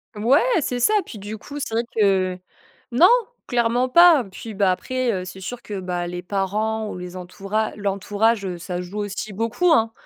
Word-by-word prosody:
Ouais, 235 +8 +4 0.2
c'est 250 -3 -2
ça. 335 - +3
Puis, 225 - -9
du 205 +2 -6
coup, 285 +7 -8
c'est 245 - -4
vrai 230 - +1
que 190 -3 +2 0.5
non, 295 +10 +6 0.4
clairement 245 +1 +1
pas. 340 -1 +7
Puis, 220 +3 -8
bah, 195 -2 +2
après, 255 +6 -1
heu, 185 -3 -3
c'est 185 +1 -9
sûr 240 +6 -6
que, 205 -2 -6
bah, 180 -1 -3
les 175 0 -5
parents 210 +4 -1
ou - - -6
les 180 0 -7
entoura 195 +4 -3
l'entourage, 205 +2 0
heu, 180 -2 -4
ça 175 +1 -5
joue 185 +4 -6
aussi 205 +1 -4
beaucoup, 230 - +1
hein, 225 -5 +3
210 Hz, 190 wpm, -22 LUFS, 185-235 Hz, 0.5 s, pas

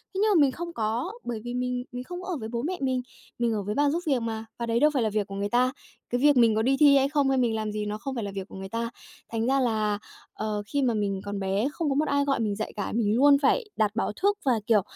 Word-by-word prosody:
Thế - - -1
nhưng 430 - +4
mà 335 -6 +5
mình 275 -2 +4
không 340 +4 -6
có, 230 - -1
bởi 235 -2 -4
vì 240 0 -5
mình 250 0 -2
mình 250 0 -5
không 360 +5 -7
ở 360 -4 -3
với 220 - -5
bố 235 - -2
mẹ 355 +7 -2
mình, 260 -1 0 0.4
mình 235 -2 +1
ở 205 -2 -2
với 210 +2 -3
bà 290 0 +3
giúp 340 +4 -1
việc 265 -5 +2
mà, 225 -1 -3
và 235 - -1
đấy 230 0 +1
đâu 300 +1 +5
phải 255 -4 +1
là 220 - +1
việc 210 -1 -1
của 195 - -7
người 200 +1 -2
ta. 250 +2 +3 0.4
Cái 245 +1 -1
việc 290 -2 +5
mình 230 -2 +5
có 220 - +2
đi 270 +4 +2
thi 285 -2 +7
hay 275 +1 +3
không 285 -2 +2
hay 265 - +2
mình 235 -3 +2
làm 215 -1 -2
gì 210 0 -3
nó 210 0 -3
không 265 +4 -5
phải 230 - -2
là 200 - -4
việc 195 -1 -4
của - - -11
người 190 0 -7
ta. 230 +1 -2 0.4
Thành 225 0 -1
ra 270 +1 +3
là, 215 -4 +1 0.4
ờ, 215 -1 -3
khi 285 +4 0
mà 245 -3 +2
mình 200 -2 -1
còn 205 0 -4
bé 195 +5 0
không 330 -3 -1
có 275 - 0
một 305 +1 +1
ai 285 0 +2
gọi 275 -2 +1
mình 210 -3 0
dậy 220 - -4
cả, 205 -2 -3
mình 215 -2 +2
luôn 280 +2 +6
phải 480 - +3
đặt 210 -1 +2
báo 230 - 0
thức, 410 0 +3
và, 260 - +4 0.2
kiểu, 215 -3 +5
240 Hz, 310 wpm, -27 LUFS, 215-275 Hz, 0.4 s, thi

